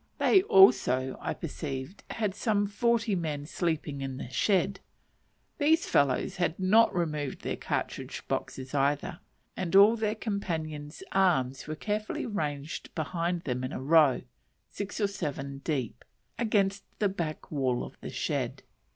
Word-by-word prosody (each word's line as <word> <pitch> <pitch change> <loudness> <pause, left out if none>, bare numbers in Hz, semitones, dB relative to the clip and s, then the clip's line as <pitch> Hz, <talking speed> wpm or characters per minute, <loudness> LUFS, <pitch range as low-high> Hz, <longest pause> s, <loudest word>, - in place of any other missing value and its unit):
They 385 - +5
also, 370 - +5
I - - -2
perceived, 145 0 -5
had 210 -4 -1
some 205 0 +1
forty 230 +1 +1
men 150 -5 -3
sleeping 155 -4 -2
in 135 -1 -4
the 125 - -6
shed; 195 - +1 0.8
these 320 +3 +4
fellows 140 +7 +2
had 175 -2 0
not 215 +5 +5
removed 150 -6 -2
their - - -2
cartridge - - -4
boxes 130 0 -4
either, 145 +5 0 0.4
and 185 -1 -2
all 205 +4 +8
their 215 -1 -1
companions' 160 -8 -4
arms 145 -10 +2
were 155 - -3
carefully 210 +5 -2
ranged 150 -7 -3
behind 170 +2 -1
them 125 -1 -2
in 130 - -3
a - - -4
row, 145 -1 +4 0.5
six 200 +1 -5
or 210 - +3
seven 140 -8 -4
deep, 140 -6 -3 0.4
against 200 -4 +1
the 210 - +2
back 170 -5 -4
wall 130 -5 0
of - - -9
the - - -6
shed. - - -2
170 Hz, 140 wpm, -29 LUFS, 140-205 Hz, 0.8 s, all